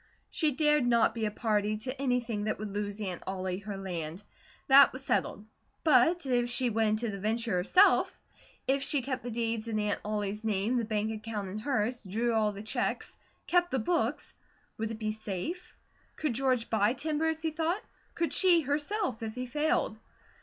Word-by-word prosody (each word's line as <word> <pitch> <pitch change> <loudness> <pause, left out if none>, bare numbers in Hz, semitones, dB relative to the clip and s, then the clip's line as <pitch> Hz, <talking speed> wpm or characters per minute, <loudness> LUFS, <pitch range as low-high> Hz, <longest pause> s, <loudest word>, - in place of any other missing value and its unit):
She 310 -3 +2
dared 300 -2 +3
not 235 -2 +4
be 225 -1 -2
a - - 0
party 210 -1 0
to 255 +5 -4
anything 240 -5 0
that 215 - -1
would 210 0 -5
lose 205 0 -3
Aunt 185 -5 -4
Ollie 185 -1 -3
her 200 0 -6
land; 175 -1 -5 0.4
that 275 +1 +8
was 260 +1 -8
settled; 205 - -1 0.4
but 320 +3 +4
if 245 -2 +1
she 245 0 +1
went 220 0 +1
into 235 - 0
the 195 - -8
venture 225 +2 -1
herself, 205 - +4 0.5
if 275 +1 +1
she 275 -1 +1
kept 260 -1 -3
the 245 - -5
deeds 230 -1 -2
in 220 -2 -1
Aunt 210 -1 0
Ollie's 210 0 -3
name, 215 +3 0
the 235 - 0
bank 215 0 -1
account 215 -2 -5
in 205 +3 -5
hers, 245 -1 -1
drew 225 +4 -1
all 215 -1 +2
the 200 0 -8
checks, 215 - -2 0.3
kept 350 0 +2
the 265 - 0
books, 335 +9 -1 0.5
would 220 0 -1
it 225 - -5
be 215 -1 -2
safe? 220 - -5 0.4
Could 305 -5 -1
George 255 -1 +1
buy 215 +1 +3
timber 310 +3 -1
as 320 0 -1
he 320 - 0
thought; 330 +6 -1 0.3
could 335 -1 0
she, 355 -3 +5
herself, 295 - -1
if 220 -1 -5
he 250 0 -3
failed? 255 -4 0
230 Hz, 190 wpm, -30 LUFS, 210-275 Hz, 0.5 s, that